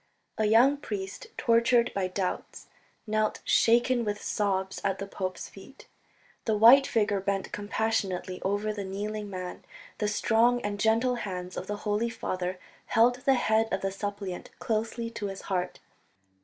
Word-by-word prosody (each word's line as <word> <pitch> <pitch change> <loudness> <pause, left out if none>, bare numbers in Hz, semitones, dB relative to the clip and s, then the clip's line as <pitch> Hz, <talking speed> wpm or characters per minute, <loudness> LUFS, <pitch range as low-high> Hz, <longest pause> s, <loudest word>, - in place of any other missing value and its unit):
A 215 - +3
young 240 +7 +5
priest, 195 -8 -6
tortured 235 +1 +3
by 195 -2 0
doubts, 185 0 -4 0.4
knelt 215 -1 0
shaken 240 +1 +3
with 210 -1 -2
sobs 190 -2 -1
at 195 -1 0
the 195 - -4
pope's 185 -2 -5
feet. - - -14 0.6
The 220 -2 +1
white 250 +6 +8
figure 205 -3 +1
bent 195 0 -2
compassionately 205 -3 -2
over 205 +2 -1
the 205 -1 -4
kneeling 205 +2 -4
man, 185 -2 -6 0.4
the 210 - +1
strong 230 +3 +3
and 205 0 -3
gentle 230 +4 +2
hands 185 -4 -5
of - - -5
the 210 - -3
Holy 210 +3 +1
Father 185 -5 -3 0.3
held 240 +2 +4
the 265 +1 +2
head 220 -2 +2
of 195 - -1
the 195 - -1
suppliant 200 -2 -5
closely 230 +1 -2
to 210 -3 -4
his 195 -1 -6
heart. 180 -2 -3
210 Hz, 155 wpm, -28 LUFS, 195-230 Hz, 0.6 s, white